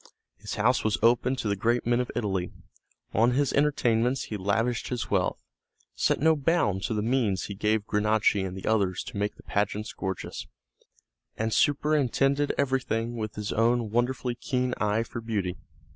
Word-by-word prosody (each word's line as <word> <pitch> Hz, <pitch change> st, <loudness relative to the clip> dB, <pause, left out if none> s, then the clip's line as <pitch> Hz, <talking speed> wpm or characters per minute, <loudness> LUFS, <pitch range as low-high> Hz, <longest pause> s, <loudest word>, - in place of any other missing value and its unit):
His 105 Hz, +2 st, -6 dB
house 120 Hz, +4 st, +2 dB
was 110 Hz, -1 st, +1 dB
open 120 Hz, +3 st, +3 dB
to 125 Hz, -4 st, -3 dB
the 100 Hz, -, +1 dB
great 120 Hz, +5 st, 0 dB
men 120 Hz, +1 st, +2 dB
of 125 Hz, -, -2 dB
Italy; 95 Hz, -6 st, -1 dB, 0.6 s
on 115 Hz, +3 st, +3 dB
his 140 Hz, +1 st, +1 dB
entertainments 125 Hz, -4 st, +2 dB
he 110 Hz, -, -5 dB
lavished 110 Hz, +4 st, 0 dB
his 125 Hz, -2 st, -4 dB
wealth, -, -, 0 dB, 0.5 s
set -, -, +1 dB
no 160 Hz, +2 st, +4 dB
bounds 135 Hz, -, +1 dB
to 110 Hz, -, -2 dB
the 105 Hz, -, -1 dB
means 110 Hz, -6 st, +1 dB
he 100 Hz, -, -5 dB
gave 105 Hz, +1 st, 0 dB
Granacci 105 Hz, -1 st, +2 dB
and 95 Hz, 0 st, -5 dB
the 95 Hz, -, -7 dB
others 100 Hz, -5 st, +1 dB
to -, -, -8 dB
make 105 Hz, +1 st, -1 dB
the -, -, -16 dB
pageants 105 Hz, +1 st, -2 dB
gorgeous, 95 Hz, -2 st, -5 dB, 0.9 s
and 110 Hz, 0 st, -1 dB
superintended 145 Hz, -1 st, +2 dB
everything 120 Hz, -4 st, 0 dB
with 110 Hz, -2 st, -4 dB
his 105 Hz, -1 st, -3 dB
own 115 Hz, -1 st, +2 dB
wonderfully 125 Hz, +1 st, 0 dB
keen 125 Hz, 0 st, -1 dB
eye 105 Hz, +2 st, +1 dB
for 115 Hz, 0 st, -7 dB
beauty. 100 Hz, -6 st, -2 dB
115 Hz, 170 wpm, -27 LUFS, 105-125 Hz, 0.9 s, no